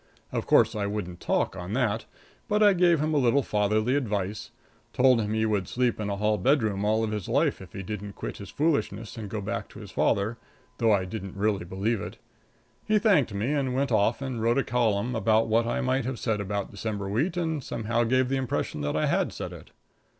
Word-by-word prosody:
Of - - -3
course, 115 - +4
I 100 -1 -1
wouldn't 100 -4 -4
talk - - 0
on 90 +3 -6
that, 115 -3 0 0.4
but 210 -1 +2
I 205 -1 +7
gave 175 -3 +4
him 155 +1 0
a 150 - +3
little 130 +2 +3
fatherly 110 +3 +1
advice 105 -6 -2 0.4
told 125 -2 +4
him 105 0 -2
he 110 0 +1
would 105 -4 0
sleep 125 -2 0
in 105 -1 -2
a 100 - -1
hall 105 +1 +1
bedroom 110 -4 +2
all 110 +2 +2
his 105 -3 -4
life - - +1
if 95 - -12
he 95 - -5
didn't 105 +1 -6
quit - - -6
his 100 -3 -9
foolishness 140 - -1
and 110 -4 -6
go 110 0 -3
back 100 - -4
to - - -12
his - - -10
father, 105 +4 +1 0.4
though 115 -2 +4
I 100 -3 +2
didn't 95 0 -6
really 100 -3 0
believe 100 +4 -1
it. - - -7 0.7
He 215 0 +2
thanked 195 - +3
me 115 +8 0
and 135 -3 0
went 135 0 0
off 110 +4 +2
and 130 -4 -3
wrote 115 +2 +2
a 135 - +3
column 120 -1 0
about 110 0 +3
what 115 +1 +2
I - - 0
might 130 0 0
have 130 -1 -3
said 110 -3 -1
about 100 0 -3
December 100 -1 -4
wheat, 150 - 0
and 160 -5 -1
somehow 115 +1 -1
gave 130 +2 +2
the 135 +1 0
impression 125 - -2
that 75 +1 -1
I 80 - +1
had - - +1
said - - -6
it. - - -12
110 Hz, 220 wpm, -27 LUFS, 100-130 Hz, 0.7 s, I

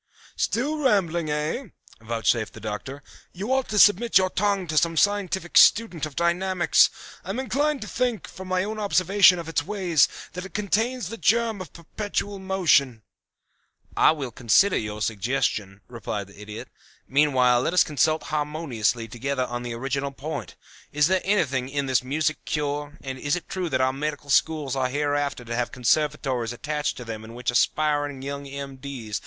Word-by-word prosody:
"Still 290 +7 -1
rambling, 175 - +1
eh?" 150 - -2 0.4
vouchsafed 115 0 0
the - - -10
Doctor. 110 +7 -6 0.3
"You 205 +8 -2
ought 265 -1 0
to 210 - -2
submit 210 +2 +6
your 185 -1 +2
tongue 200 -1 0
to 155 -2 -4
some 165 +2 -1
scientific 190 -3 0
student 180 -9 +4
of 145 - -14
dynamics. 175 0 +3 0.3
I 180 - -10
am 205 +6 -2
inclined 280 +3 0
to - - -8
think, 245 -5 -1
from 190 0 -10
my 185 0 +1
own 215 +2 -4
observation 195 -2 +4
of 170 -2 -6
its 165 -2 0
ways, 175 -5 +2 0.3
that 180 0 -5
it 195 - -11
contains 215 +2 0
the 230 - -6
germ 225 -2 +1
of 185 - -9
perpetual 200 +3 -4
motion." 160 - +2 0.9
"I - - +5
will 140 -6 -5
consider 125 - +3
your 105 0 -3
suggestion," 105 -3 -1
replied 105 -4 -5
the 100 +2 -15
Idiot. 105 +1 -8 0.4
"Meanwhile, 130 -3 +3
let 165 - -1
us - - +7
consult 155 +1 +1
harmoniously 145 -7 -1
together 130 +3 -2
on 120 0 -5
the 120 -1 -5
original 135 +3 -2
point. 150 +4 -6 0.4
Is 150 0 +3
there 190 -1 +2
anything 140 -10 0
in 140 0 -2
this 130 -3 +2
music 155 +4 -1
cure, 145 -1 -3
and 130 -1 -5
is 145 +4 0
it 175 - -7
true 185 -2 -3
that 130 - 0
our 130 0 +2
Medical 145 0 -4
Schools 150 -2 +2
are 130 -1 0
hereafter 145 -2 -1
to 115 0 -4
have 120 0 -1
conservatories 130 -2 0
attached 150 +4 -3
to 125 - -8
them 110 -1 -6
in 115 +1 -11
which 125 0 -1
aspiring 145 +1 +1
young 140 0 -5
M.D.' 135 -4 -7
150 Hz, 170 wpm, -25 LUFS, 130-185 Hz, 0.9 s, us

